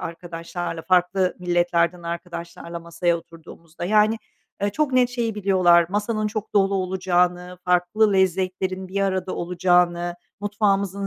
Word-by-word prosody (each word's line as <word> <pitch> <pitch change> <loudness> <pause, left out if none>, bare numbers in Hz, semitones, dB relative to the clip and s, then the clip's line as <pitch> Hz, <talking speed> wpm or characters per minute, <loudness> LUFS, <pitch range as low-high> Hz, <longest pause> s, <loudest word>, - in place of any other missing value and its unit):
arkadaşlarla, 170 0 -6
farklı 185 +1 +2
milletlerden 175 -1 +1
arkadaşlarla 170 0 -6
masaya 170 +1 -1
oturduğumuzda. 165 0 -11
Yani, 215 +3 +3 0.4
ııı, 205 - +1
çok 295 +2 0
net 250 -1 +4
şeyi 235 -3 -2
biliyorlar: 185 -4 +4
Masanın 210 +2 -1
çok 215 0 -5
dolu 195 -1 +3
olacağını, 180 -1 0
farklı 180 +4 +2
lezzetlerin 185 0 0
bir 195 +2 -2
arada 190 -1 -1
olacağını, 175 0 +1 0.3
mutfağımızın 200 -1 0
180 Hz, 120 wpm, -23 LUFS, 175-200 Hz, 0.4 s, net